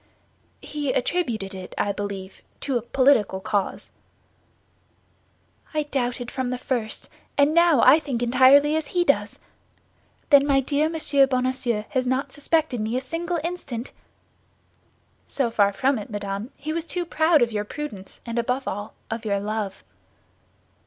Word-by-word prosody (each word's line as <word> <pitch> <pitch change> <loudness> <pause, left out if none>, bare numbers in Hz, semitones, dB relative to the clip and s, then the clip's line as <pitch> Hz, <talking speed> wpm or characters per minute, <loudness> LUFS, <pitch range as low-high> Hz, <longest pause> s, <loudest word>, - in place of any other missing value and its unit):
"He 290 -3 -2
attributed 240 - -1
it, 185 -1 -9
I 205 - +1
believe, 200 -1 -6 0.2
to 275 - -2
a 240 - +1
political 240 -5 +2
cause." 200 +1 -2 1.8
"I 305 - +1
doubted 245 -4 -3
from 260 -2 -2
the 250 - -2
first; 240 -4 -3 0.3
and 285 +2 +4
now 335 -6 +5
I 275 +5 +7
think 260 -6 -3
entirely 265 +5 +5
as 315 -1 -1
he 350 - +5
does. 225 -10 +1 0.9
Then 285 0 +7
my 275 -1 +4
dear 290 +3 +1
Monsieur 285 -4 +3
Bonacieux 255 -4 0
has 255 -1 -1
not 260 +2 -1
suspected 290 -4 0
me 220 +3 -1
a - - +1
single 335 +6 -3
instant?" 275 -9 -5 1.4
"So 255 -5 -1
far 200 -3 +3
from 260 +5 +1
it, 205 - -8
madame, 205 +1 -4
he 310 +2 -4
was 335 0 -3
too 355 -1 -2
proud 315 -3 +3
of 235 - -1
your 210 -1 -1
prudence, 210 -5 -8
and 235 0 -2
above 250 +3 -1
all, 205 +2 -5 0.2
of 225 +1 -3
your 200 -2 0
love." 205 -1 -4
255 Hz, 150 wpm, -24 LUFS, 215-290 Hz, 1.8 s, I